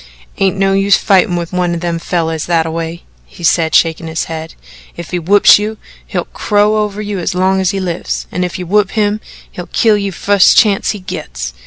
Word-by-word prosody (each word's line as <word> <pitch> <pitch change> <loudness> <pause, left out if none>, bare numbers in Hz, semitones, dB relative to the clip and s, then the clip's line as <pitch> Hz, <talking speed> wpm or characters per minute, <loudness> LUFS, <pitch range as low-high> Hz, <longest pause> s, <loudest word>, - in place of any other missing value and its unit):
"Ain't 195 0 +1
no 195 0 +2
use 195 +1 +3
fightin' 190 -1 +2
with 170 0 -4
one 180 -1 0
o' - - -3
them 170 0 -3
fellers 165 -2 -2
thataway," 165 0 -2 0.2
he 175 - -14
said, 160 -1 +2
shaking 165 0 +2
his 160 0 -2
head. 160 0 -7 0.4
"If 170 -1 -8
he 180 - -1
whoops 200 +5 +5
you, 215 +1 -4 0.3
he'll - - -3
crow 210 0 +1
over 210 0 -2
you 205 -2 -4
as 180 +1 -2
long 190 +1 +1
as 185 - +1
he 195 0 -2
lives, 180 -2 -3
and 180 - -2
if 180 - -3
you 180 - -5
whoop 200 +2 +2
him, 210 -1 0 0.3
he'll 180 - -8
kill 220 -2 +2
ye 200 -1 -2
the 185 - -9
fust 200 -2 +4
chance 205 -3 +3
he 210 - -2
gets. - - -6
180 Hz, 210 wpm, -14 LUFS, 165-200 Hz, 0.4 s, whoops